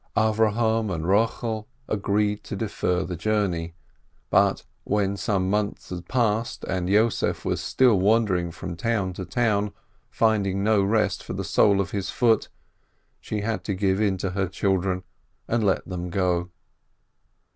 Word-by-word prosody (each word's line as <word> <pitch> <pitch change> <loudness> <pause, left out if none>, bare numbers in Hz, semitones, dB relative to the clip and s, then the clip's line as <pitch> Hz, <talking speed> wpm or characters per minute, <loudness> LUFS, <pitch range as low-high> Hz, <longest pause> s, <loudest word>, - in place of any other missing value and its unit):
Avrohom 110 0 +2
and 80 -2 -3
Rochel 110 +2 0 0.2
agreed 105 0 0
to - - -5
defer 95 -3 -1
the 90 -1 -4
journey, 85 -4 -1 0.6
but - - +3 0.2
when 100 -1 0
some 100 -3 0
months 105 0 -2
had 90 -1 -6
passed, 115 -2 0
and 90 -1 -2
Yossef 110 +3 +1
was - - -1
still 125 -7 +3
wandering 95 -4 +2
from 85 +1 -6
town 100 -1 -1
to 95 +1 -6
town, 105 -3 0 0.4
finding 100 -4 +1
no 105 -1 +3
rest 100 -1 +1
for - - -6
the - - -3
sole 100 -2 +3
of 100 0 -1
his 100 -2 -3
foot, 115 -3 +2 0.7
she 105 - -4
had 110 +1 -2
to 100 - -1
give 95 +1 +1
in 100 -3 +1
to 95 0 -2
her 95 0 -1
children 95 0 0 0.4
and 115 -1 0
let 95 -2 +1
them 90 -1 -4
go. 90 -1 0
100 Hz, 150 wpm, -25 LUFS, 95-110 Hz, 0.7 s, but